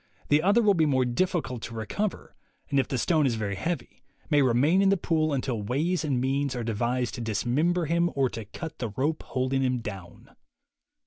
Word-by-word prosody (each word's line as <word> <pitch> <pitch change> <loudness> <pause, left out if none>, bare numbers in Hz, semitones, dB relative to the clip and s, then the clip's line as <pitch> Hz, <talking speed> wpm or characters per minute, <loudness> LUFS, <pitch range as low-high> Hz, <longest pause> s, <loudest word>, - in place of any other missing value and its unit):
The 145 +1 +4
other 205 +7 +4
will 205 -1 +5
be 160 -4 +2
more 130 -3 +2
difficult 130 - -1
to 115 - -7
recover, 185 - -3 0.4
and 140 - +3
if 135 - +1
the 130 - -2
stone 155 +3 +2
is 120 - 0
very 105 -3 -2
heavy, 160 - -4 0.3
may 145 -1 +5
remain 140 +9 +3
in 195 - +4
the 195 - +3
pool 155 -3 0
until 130 -5 -1
ways 155 - 0
and 140 -5 0
means 135 +1 0
are 120 - -3
devised 120 +3 -1
to 120 - -5
dismember 140 - 0
him 170 +2 +2
or 135 -1 +3
to 110 -1 -6
cut 160 - -8
the 120 -3 -2
rope 140 +9 -1
holding 130 +1 -1
him 130 -1 +1
down." 95 -6 -9
135 Hz, 200 wpm, -27 LUFS, 120-165 Hz, 0.4 s, will